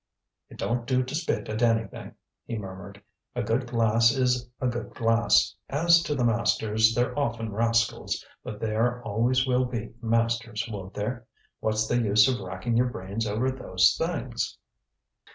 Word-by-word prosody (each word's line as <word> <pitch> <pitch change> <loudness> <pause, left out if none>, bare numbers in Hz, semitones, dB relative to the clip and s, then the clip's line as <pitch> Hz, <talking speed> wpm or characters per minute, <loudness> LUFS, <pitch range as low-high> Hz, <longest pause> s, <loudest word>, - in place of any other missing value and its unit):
"It - - -13
don't 120 0 -2
do 130 -1 +2
to 130 +2 -7
spit 160 +2 -1
at 110 +1 -3
anything," 115 -4 0 0.3
he 115 - -3
murmured. 95 -2 -9 0.3
"A - - -1
good 120 +3 0
glass 115 -1 +3
is 125 -2 0
a - - -2
good 120 -2 -3
glass. 115 0 +3
As 170 +4 +4
to 150 -3 -2
the 130 - 0
masters, 110 -1 +2
they're 120 0 0
often 115 -5 -2
rascals; 115 +1 0 0.2
but 105 - -7
there 115 +3 0
always 120 +4 +1
will 130 0 +2
be 115 -3 -5
masters, 115 0 0
won't 100 -4 -7
there? 115 +3 -4 0.3
What's 110 0 0
the 120 +2 +1
use 105 -1 +5
of 130 -2 0
racking 95 +5 -2
your 125 +1 +3
brains 100 +1 -4
over 115 +6 0
those 95 -5 +2
things?" 155 -8 -3
115 Hz, 160 wpm, -27 LUFS, 110-125 Hz, 0.3 s, use